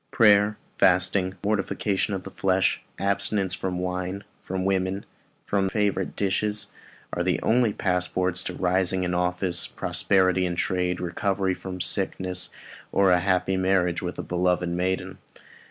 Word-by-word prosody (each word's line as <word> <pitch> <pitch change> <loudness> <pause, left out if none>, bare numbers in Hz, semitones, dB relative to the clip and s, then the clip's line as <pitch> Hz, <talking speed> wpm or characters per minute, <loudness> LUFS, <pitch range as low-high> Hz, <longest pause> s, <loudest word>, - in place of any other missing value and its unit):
Prayer 105 -3 +6
and 105 - -7 0.2
fasting, 95 +1 +3
mortification 100 0 0
of 95 - -5
the 95 - -9
flesh, 95 0 +1 0.2
abstinence 100 -1 0
from 90 0 -3
wine, 90 +2 -3 0.2
from 95 0 -3
women, 95 -1 +1
and 100 - -8 0.4
from 95 -1 +1
favourite 100 -2 -1
dishes, 105 +1 -1 0.4
are - - -1
the - - +1
only 120 -1 +3
passports 90 -1 0
to 90 - -4
rising 95 0 +1
in 90 0 -1
office, 90 0 0
prosperity 95 -2 +1
in 90 -1 -1
trade, 90 0 -1
recovery 95 +2 -1
from 90 0 -7
sickness, 90 +1 -1 0.4
or 100 -1 +4
a 90 - +5
happy 95 0 +1
marriage 95 -2 +1
with - - -4
a - - -4
beloved 90 0 0
maiden. 90 +2 -2
95 Hz, 145 wpm, -25 LUFS, 90-100 Hz, 0.4 s, Prayer